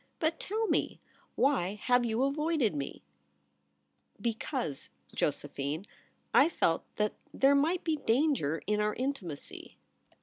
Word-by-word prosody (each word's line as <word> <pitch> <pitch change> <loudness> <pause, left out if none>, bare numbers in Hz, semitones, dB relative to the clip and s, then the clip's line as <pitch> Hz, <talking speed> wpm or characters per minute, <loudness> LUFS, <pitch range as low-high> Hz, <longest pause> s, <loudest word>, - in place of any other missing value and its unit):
But 320 -1 0
tell 440 +3 -1
me, - - 0 0.4
why 210 -9 +2
have 245 0 +4
you 230 +2 +1
avoided 290 - +1
me 140 -2 -5 0.4
?' 70 0 -45
* 70 0 -42
Because, 225 - -3 0.2
Josephine, 145 +3 -2 0.5
I 290 - +7
felt 165 - +1
that 210 0 +1 0.2
there 270 +1 +4
might 315 +6 +2
be 320 -2 +1
danger 235 - +1
in 210 +1 +1
our 210 0 +1
intimacy.' 240 - -5
225 Hz, 130 wpm, -31 LUFS, -, 0.5 s, I